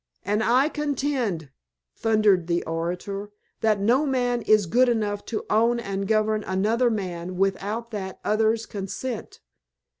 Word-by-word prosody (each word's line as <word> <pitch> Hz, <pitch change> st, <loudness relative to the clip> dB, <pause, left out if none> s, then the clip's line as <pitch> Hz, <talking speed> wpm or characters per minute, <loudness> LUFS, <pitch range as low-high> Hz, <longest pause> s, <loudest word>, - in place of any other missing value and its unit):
"And 210 Hz, +2 st, +1 dB
I 255 Hz, +5 st, +4 dB
contend," 270 Hz, -, -2 dB, 0.4 s
thundered 215 Hz, -6 st, +3 dB
the 170 Hz, 0 st, 0 dB
orator, 180 Hz, +5 st, -4 dB, 0.3 s
"that 215 Hz, -2 st, +2 dB
no 245 Hz, +9 st, +3 dB
man 245 Hz, -2 st, +1 dB
is 215 Hz, -2 st, +4 dB
good 245 Hz, +8 st, +3 dB
enough 210 Hz, -3 st, -1 dB
to 225 Hz, -, -4 dB
own 230 Hz, +3 st, +3 dB
and 195 Hz, -3 st, -3 dB
govern 215 Hz, 0 st, +1 dB
another 215 Hz, +6 st, +2 dB
man 185 Hz, -4 st, -4 dB
without 200 Hz, +4 st, -1 dB
that 190 Hz, -3 st, -5 dB
other's 220 Hz, +1 st, +2 dB
consent. 210 Hz, +4 st, -6 dB
215 Hz, 130 wpm, -25 LUFS, 195-235 Hz, 0.4 s, I